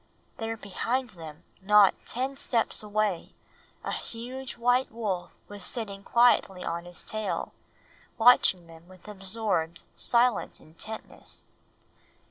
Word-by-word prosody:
There 225 0 -3
behind 235 +5 -2
them, 160 -2 -10 0.2
not 205 0 +6
ten 260 +3 -2
steps 235 -4 0
away, 210 -4 -1 0.5
a - - -3
huge 250 +3 -5
white 245 +2 +2
wolf 200 -6 -3 0.2
was 205 0 -9
sitting 205 -5 -1
quietly 235 -6 +4
on 170 +1 -3
his 175 0 -7
tail, 215 -1 -2 0.6
watching 225 -7 +6
them 165 0 -15
with 185 +2 -16
absorbed, 195 -4 -2
silent 240 -2 +2
intentness. 190 +8 -8
210 Hz, 110 wpm, -28 LUFS, 180-235 Hz, 0.6 s, not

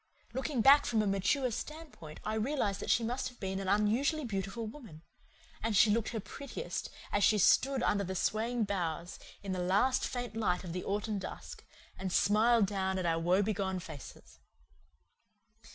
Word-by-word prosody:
Looking 265 0 -1
back 280 +4 +7
from 220 -2 +2
a - - -1
mature 200 +7 +1
standpoint 300 - -8
I 215 - -1
realize 220 -3 0
that - - -5
she 235 - +3
must 245 +3 -2
have 250 - -19
been 190 0 -3
an 195 - -4
unusually 235 - +2
beautiful 195 +1 -3
woman; 215 - -10 0.6
and 220 -2 0
she 210 +2 +6
looked 225 +1 +1
her 225 - -3
prettiest 280 - -6 0.2
as 205 - +1
she 215 - +5
stood 265 +6 +4
under 200 -1 +2
the 190 0 -4
swaying 225 +5 0
boughs 175 -4 -3 0.2
in 195 - -4
the 185 - -2
last 205 +9 +2
faint 245 -3 -5
light 200 -5 0
of 170 -3 -6
the 180 - -3
autumn 205 +1 -2
dusk - - -8 0.4
and 190 -1 -3
smiled 220 +3 +4
down 190 -1 -1
at 185 - -2
our 165 -1 +1
woebegone 190 +2 +1
faces. 155 -6 -11
210 Hz, 170 wpm, -32 LUFS, 190-240 Hz, 0.6 s, back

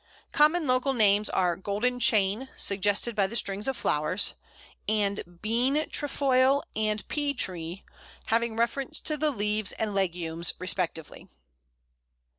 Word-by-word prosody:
Common 310 +3 +3
local 255 +1 +1
names 210 -3 +3
are 180 -2 +1
Golden 210 +7 -2
Chain, 215 +3 +2
suggested 205 +3 +1
by 200 -2 +2
the 230 - -8
strings 205 -1 0
of 265 -2 -1
flowers, 155 +6 0 0.6
and 205 -2 +1 0.2
Bean 240 +5 +1 0.2
trefoile 275 -1 +2
and 215 -1 -1
Pea 290 -1 -1
tree, 175 -5 -3 0.4
having 230 0 0
reference 235 +4 -1
to 305 - -2
the 305 +1 0
leaves 210 -4 0
and 215 -2 -3
legumes 170 -3 -1
respectively. 180 -3 -3
215 Hz, 125 wpm, -27 LUFS, 195-255 Hz, 0.6 s, Common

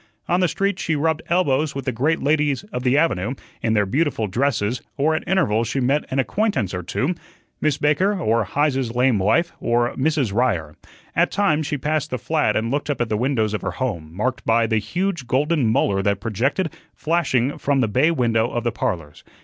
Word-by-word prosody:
On 175 - +2
the 180 - +3
street 195 +3 -1
she 160 - 0
rubbed 160 +1 0
elbows 155 -5 +1
with 135 -2 -4
the 130 - 0
great 140 +8 0
ladies 145 0 +1
of 125 - -2
the 125 +2 +2
avenue 130 - +1 0.3
in 115 -2 +1
their 105 -2 +3
beautiful 130 +1 0
dresses, 120 +1 0 0.2
or 155 +3 +2
at 155 - -1
intervals 125 - +2
she 135 - -1
met 135 +4 +1
an 130 - -2
acquaintance 135 - 0
or 90 - -3
two 130 - -1 0.5
Miss 150 -2 +1
Baker, 185 +7 +2
or 115 -7 +2
Heise's 135 +1 0
lame 125 -3 +3
wife, 135 - +2
or 120 +1 +1
Mrs. 135 -6 0
Ryer. 95 -11 0 0.4
At - - +3
times 160 -7 +1
she 150 - -1
passed 155 +2 -1
the 125 - -2
flat 125 -2 0
and 115 +2 0
looked 145 +2 -2
up 145 - -1
at 120 -2 0
the 110 - 0
windows 110 -2 0
of 105 - -2
her - - -3
home, 90 -12 -3
marked 125 +9 -2
by 115 +1 +3
the 110 -1 +1
huge 175 - -2
golden 145 +1 +1
molar 100 -3 +2
that 100 0 0
projected, 130 - -1 0.2
flashing, 150 -5 0
from 140 -1 +1
the 120 - +2
bay 130 +9 +3
window 120 -7 +1
of 120 - -3
the 120 - 0
"Parlors." 80 -9 -4
130 Hz, 205 wpm, -22 LUFS, 110-155 Hz, 0.5 s, the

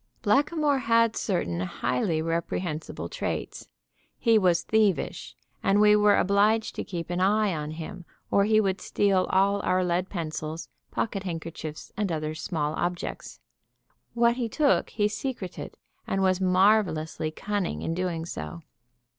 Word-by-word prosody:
Blackamoor 285 +5 +2
had 230 -2 +3
certain 85 - -1
highly 155 - -1
reprehensible 165 - -3
traits. - - -4 0.5
He 225 -2 +4
was 180 -3 +3
thievish, 215 -4 0 0.3
and 195 +1 +3
we 210 0 +6
were 210 -1 +5
obliged 210 +3 +2
to - - -4
keep 170 -2 -5
an 175 - -1
eye 205 +1 +3
on 150 -2 -4
him, 165 +3 -7 0.3
or 200 - +4
he 215 0 +4
would 195 -3 0
steal 195 -2 +1
all 200 +1 +3
our 185 -1 +1
lead 180 +1 0
pencils, 155 -2 -5 0.2
pocket 205 -3 -2
handkerchiefs 165 -4 -6
and 205 -3 -1
other 155 -1 -2
small 155 -1 -2
objects. 175 +2 -4 0.7
What 235 0 +3
he 240 -3 -1
took 290 +4 +2
he 210 -2 +1
secreted, 210 -4 -5 0.3
and 195 0 0
was 185 0 +2
marvelously 185 -5 +2
cunning 200 +3 -3
in 165 - -1
doing 175 -2 -2
it. 120 - -6
185 Hz, 140 wpm, -27 LUFS, 165-210 Hz, 0.7 s, we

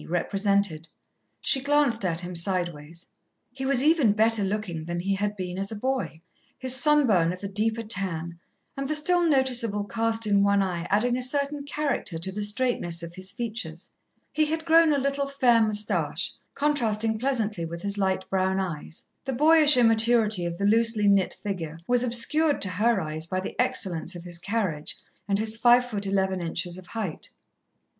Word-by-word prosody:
represented. 195 -2 0 0.5
She 265 - +4
glanced 280 -5 +1
at 170 -2 -1
him 180 0 -7
sideways. 170 -2 -2 0.5
He 265 0 -5
was 270 -1 +4
even 300 -9 +3
better 220 0 +2
looking 195 -5 -3
than 175 +1 -4
he 195 +2 -1
had 205 +1 -3
been 180 0 -5
as 195 +2 -2
a - - -5
boy, 255 -7 -3 0.4
his 260 -1 +4
sunburn 245 - +3
of 185 +2 -9
a - - -2
deeper 220 +3 0
tan, 170 -6 -3 0.4
and 275 0 -4
the 305 - -1
still 350 +4 +3
noticeable 255 -9 +2
cast 225 +1 0
in 200 -1 +2
one 200 0 +3
eye 175 -3 -4
adding 240 +5 +1
a - - -4
certain 280 +2 -1
character 285 - -2
to 170 +4 -3
the 210 +2 -5
straightness 205 -6 -1
of 170 0 -8
his 185 +1 -6
features. 215 -8 -5 0.4
He 310 - +2
had 320 +1 -3
grown 330 -1 +5
a 290 - +2
little, 275 +1 -1
fair 250 -4 +3
moustache, 215 -1 0 0.2
contrasting 225 -7 0
pleasantly 220 -9 -2
with 170 +1 -8
his 200 0 -1
light 190 -1 -1
brown 190 0 0
eyes. 165 -4 -5 0.2
The 265 - -3
boyish 300 +1 +6
immaturity 225 -5 +3
of 170 0 -5
the 200 - -2
loosely 225 0 +3
knit 200 -2 +2
figure 170 -6 -5
was 245 +2 +2
obscured 280 +6 +1
to 195 - +1
her 215 +4 +1
eyes 155 -1 -3
by 185 +1 -2
the 185 - -6
excellence 180 -1 -1
of 175 - -9
his 175 -1 -4
carriage 185 -6 -3 0.3
and 200 -1 +1
his 220 +1 0
five 245 +1 +4
foot 205 -4 -3
eleven 190 -1 -1
inches 175 +1 -3
of 185 - -14
height. 210 -8 -6
210 Hz, 180 wpm, -25 LUFS, 185-250 Hz, 0.5 s, boyish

